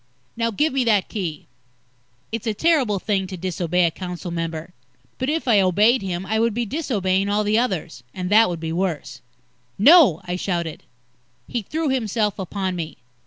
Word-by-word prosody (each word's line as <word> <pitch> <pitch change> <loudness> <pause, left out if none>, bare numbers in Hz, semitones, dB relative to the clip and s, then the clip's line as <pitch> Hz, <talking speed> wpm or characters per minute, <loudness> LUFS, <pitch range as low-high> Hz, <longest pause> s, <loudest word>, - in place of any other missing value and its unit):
Now, 230 0 0
give 295 +7 0
me 270 -1 +2
that 210 -4 +2
Key!" 175 -8 -4 0.9
It's 230 0 -4
a 215 - 0
terrible 275 -8 +2
thing 190 -1 -1
to 185 0 -7
disobey 180 0 0
a 165 - +1
council 180 0 -6
member. 165 0 -4 0.5
But 260 +2 -1
if 315 -2 -1
I 220 -4 +5
obeyed 205 +7 +3
him, 185 -1 -4
I 220 +2 0
would 230 -1 +1
be 240 0 -1
disobeying 200 - 0
all 210 +1 +1
the 210 +2 +2
others. 185 - -2
And 180 +4 -5
that 220 0 +6
would 170 -2 -4
be 160 0 -4
worse. 175 -3 -3 0.6
"No!" 270 - +7
I 180 0 -3
shouted. 170 -4 -3 0.7
He 240 - -2
threw 310 - -2
himself 220 -5 0
upon 190 0 -3
me. 165 -2 -5
200 Hz, 175 wpm, -22 LUFS, 180-230 Hz, 0.9 s, No